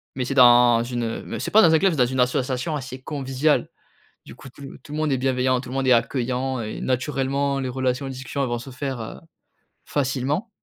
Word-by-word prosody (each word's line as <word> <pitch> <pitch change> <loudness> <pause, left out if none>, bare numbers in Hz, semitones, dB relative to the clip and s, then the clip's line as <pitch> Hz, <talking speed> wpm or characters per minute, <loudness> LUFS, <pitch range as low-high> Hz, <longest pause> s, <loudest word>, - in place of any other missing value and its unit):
mais 130 - -2
c'est 135 - -3
dans 120 -2 +6
une, 120 0 -3
heu, 115 0 -4
me - - -6
c'est - - -3
pas 220 - +6
dans 165 -2 +5
un 160 - +5
club, 190 0 +3
c'est - - -4
dans 125 - +4
une 130 +1 -3
association 130 +4 0
assez 130 -2 -7
conviviale. 140 +1 0 0.6
Du - - -11
coup, 135 - -13
tout 140 - -13 0.2
tout - - -16
le 150 - -4
monde 155 -2 0
est - - +2
bienveillant, 130 -1 +1
tout 130 - -10
le 130 - -6
monde 135 -1 0
est 130 - +5
accueillant 125 +2 0
et 110 -1 -5
naturellement 135 +1 -1
les 130 - -3
relations, 130 +1 -2
discussions 130 +2 -4
elles 130 - -1
vont 120 - -2
se 120 +3 -10
faire, 130 -1 -5
heu, 110 - -7 0.7
facilement 140 - -1
130 Hz, 230 wpm, -23 LUFS, 125-140 Hz, 0.7 s, dans